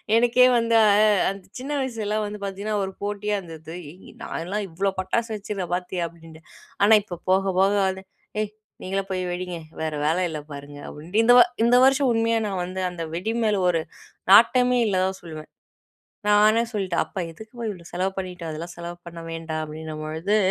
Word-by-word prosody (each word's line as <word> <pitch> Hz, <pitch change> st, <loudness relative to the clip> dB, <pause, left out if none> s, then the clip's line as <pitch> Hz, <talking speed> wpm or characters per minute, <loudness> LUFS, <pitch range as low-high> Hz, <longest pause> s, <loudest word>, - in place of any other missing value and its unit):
எனக்கே 245 Hz, +2 st, +5 dB
வந்து 230 Hz, 0 st, +2 dB
அ -, -, +5 dB
அ -, -, +6 dB, 0.3 s
அந்த 195 Hz, -1 st, -10 dB
சின்ன 260 Hz, +3 st, -6 dB
வயசுலாம் 215 Hz, -5 st, -2 dB
வந்து 210 Hz, 0 st, -6 dB
பாத்தீங்கன்னா, 200 Hz, +2 st, -3 dB
ஒரு 190 Hz, -, -3 dB
போட்டியா 205 Hz, +1 st, -2 dB
இருந்தது. 165 Hz, -2 st, -9 dB, 0.5 s
"நான்லாம் 200 Hz, +5 st, -3 dB
இவ்ளோ 190 Hz, +4 st, 0 dB
பட்டாசு 205 Hz, +5 st, -1 dB
வச்சிருக்கேன் 200 Hz, -4 st, -4 dB
பாத்தியா" 180 Hz, 0 st, -2 dB
அப்டின்ட்டு, 165 Hz, -1 st, -14 dB, 0.4 s
ஆனா 210 Hz, +2 st, +6 dB
இப்போ 190 Hz, -3 st, -7 dB
போக 190 Hz, +1 st, +4 dB, 0.2 s
போக 195 Hz, +1 st, +4 dB, 0.2 s
வந்து, 190 Hz, 0 st, -3 dB, 0.4 s
"ஏய் 215 Hz, -1 st, -1 dB, 0.3 s
நீங்களே 195 Hz, +1 st, -2 dB
போயி 185 Hz, -1 st, -1 dB
வெடிங்க 180 Hz, 0 st, -4 dB, 0.2 s
வேற 155 Hz, -1 st, -2 dB
வேல 160 Hz, +3 st, +2 dB
இல்ல 155 Hz, -2 st, -4 dB
பாருங்க," 145 Hz, 0 st, -9 dB
அப்டின்ட்டு 170 Hz, +9 st, -1 dB
இந்த 245 Hz, +2 st, +6 dB, 0.3 s
இந்த 240 Hz, +1 st, +5 dB
வருஷம் 270 Hz, -1 st, +4 dB
உண்மையா 230 Hz, 0 st, +2 dB
நான் 190 Hz, -3 st, -2 dB
வந்து 185 Hz, +1 st, -5 dB
அந்த 175 Hz, -2 st, -6 dB
வெடி 205 Hz, +7 st, -2 dB
மேல 210 Hz, -3 st, +2 dB
ஒரு 165 Hz, -2 st, +1 dB, 0.5 s
நாட்டமே 250 Hz, +3 st, +6 dB
இல்லதான் 190 Hz, -1 st, 0 dB
சொல்வேன். 155 Hz, -2 st, -9 dB, 0.8 s
நானே 215 Hz, +2 st, +5 dB
சொல்டேன், 190 Hz, -5 st, 0 dB
"அப்பா -, -, -7 dB
எதுக்கு 220 Hz, +7 st, -13 dB
பா -, -, -4 dB
இவ்ளோ 175 Hz, -4 st, -11 dB
செலவு 185 Hz, +2 st, 0 dB
பண்ணிட்டு? 180 Hz, -2 st, -6 dB
அதெல்லா 160 Hz, +3 st, -6 dB
செலவு 170 Hz, 0 st, -7 dB
பண்ண 170 Hz, 0 st, -8 dB
வேண்டா" 165 Hz, -1 st, -4 dB
அப்டின்ன 155 Hz, 0 st, -7 dB
பொழுது, 160 Hz, +7 st, 0 dB
190 Hz, 175 wpm, -24 LUFS, 170-215 Hz, 0.8 s, அ